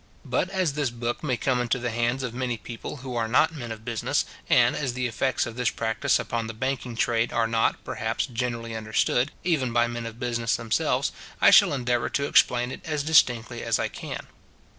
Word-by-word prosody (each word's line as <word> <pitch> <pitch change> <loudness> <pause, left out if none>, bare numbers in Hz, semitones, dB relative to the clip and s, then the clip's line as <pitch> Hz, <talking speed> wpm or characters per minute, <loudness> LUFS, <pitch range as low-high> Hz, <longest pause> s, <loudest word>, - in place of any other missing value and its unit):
But 185 - 0
as 185 -6 0
this 145 -3 0
book 120 +3 -4
may 130 -5 0
come 125 -1 +1
into 120 0 0
the 125 -1 -3
hands 120 +3 0
of 125 -2 -3
many 125 -1 -2
people 115 +6 -7
who 125 -2 -4
are 115 -1 0
not 155 +8 +3
men 120 -7 -6
of 110 0 -8
business, 115 -2 0 0.2
and - - +5
as 135 -4 -2
the 125 0 -2
effects 125 +2 0
of 115 - -7
this 125 -1 +1
practice 110 -1 0
upon 115 -1 -3
the 115 - -6
banking 130 0 -3
trade 115 0 +1
are 115 -1 +1
not, 115 0 +1
perhaps, 110 0 -2
generally 115 -2 -3
understood, 110 +4 +1
even 150 -8 +1
by 120 0 +3
men 120 -1 -4
of 115 +1 -9
business 120 -2 0
themselves, 115 -1 0 0.3
I - - +7
shall - - +7
endeavour 125 -3 0
to 140 - 0
explain 125 -3 +3
it - - -7
as 150 -2 -2
distinctly 120 -6 +3
as - - +1
I - - -1
can. - - -7
120 Hz, 205 wpm, -26 LUFS, 115-130 Hz, 0.3 s, I